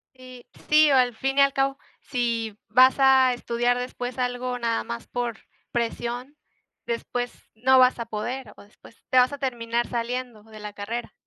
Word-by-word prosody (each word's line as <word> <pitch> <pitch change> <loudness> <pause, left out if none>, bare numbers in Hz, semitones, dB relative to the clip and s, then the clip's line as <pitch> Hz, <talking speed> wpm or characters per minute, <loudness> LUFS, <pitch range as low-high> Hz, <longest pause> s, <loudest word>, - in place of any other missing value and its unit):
Y, 255 -1 -13 0.2
sí, 305 -1 +6
o - - +5
al 245 -3 +3
fin 270 +3 -2
y - - +7
al 275 0 +4
cabo, 270 0 0 0.2
si 230 -4 -2
vas 255 +4 +6
a 265 -1 +5
estudiar 240 0 0
después 250 0 -5
algo 250 0 -2
nada 230 -1 0
más 115 0 -7
por 240 -2 -3 0.3
presión, 240 +4 -3 0.5
después 245 +1 -3 0.2
no 260 +3 +4
vas 255 -1 +4
a 230 - -3
poder 230 +3 -5
o - - -13
después 210 +2 -20
te 255 - +2
vas 250 +2 +5
a - - -4
terminar 240 -3 -2
saliendo 240 -2 -4
de 220 -1 -13
la 210 -1 -7
carrera. 225 +4 -5
245 Hz, 175 wpm, -25 LUFS, 230-255 Hz, 0.5 s, y